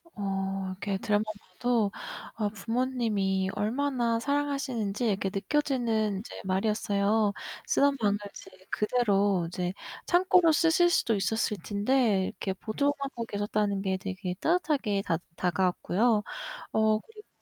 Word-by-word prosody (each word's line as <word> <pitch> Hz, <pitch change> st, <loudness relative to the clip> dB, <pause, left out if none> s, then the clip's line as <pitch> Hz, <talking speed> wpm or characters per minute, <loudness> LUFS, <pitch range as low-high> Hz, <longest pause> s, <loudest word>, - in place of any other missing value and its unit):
어. 195 Hz, -1 st, -2 dB
이렇게 195 Hz, +1 st, -3 dB
들어만 210 Hz, -2 st, +1 dB, 0.3 s
봐도 225 Hz, +1 st, +1 dB, 0.4 s
아 210 Hz, -2 st, 0 dB
부모님이 220 Hz, -4 st, 0 dB
얼마나 240 Hz, 0 st, 0 dB
사랑하시는지 270 Hz, -6 st, -1 dB
이렇게 195 Hz, -2 st, 0 dB
느껴지는 225 Hz, -3 st, 0 dB
이제 220 Hz, -, -9 dB
말이었어요. 205 Hz, +1 st, +1 dB, 0.3 s
쓰던 280 Hz, -1 st, +3 dB
방을 205 Hz, -3 st, +2 dB, 0.2 s
이제 -, -, -11 dB, 0.2 s
그대로 205 Hz, -5 st, +2 dB
이제 180 Hz, +1 st, -3 dB, 0.3 s
창고로 360 Hz, -1 st, +5 dB
쓰실 330 Hz, +2 st, +4 dB
수도 230 Hz, -9 st, +2 dB
있었을 210 Hz, +2 st, 0 dB
텐데 210 Hz, -1 st, +2 dB
이렇게 190 Hz, +1 st, -3 dB
보존하고 275 Hz, +4 st, -2 dB
계셨다는 205 Hz, -1 st, -1 dB
게 190 Hz, -1 st, 0 dB
되게 190 Hz, -1 st, -4 dB
따뜻하게 295 Hz, -, +1 dB
다 165 Hz, -, +1 dB, 0.2 s
다가왔고요. 185 Hz, +5 st, +1 dB, 0.5 s
어, 220 Hz, 0 st, +3 dB
그리고 430 Hz, -, -16 dB
215 Hz, 305 characters per minute, -29 LUFS, 195-255 Hz, 0.5 s, 창고로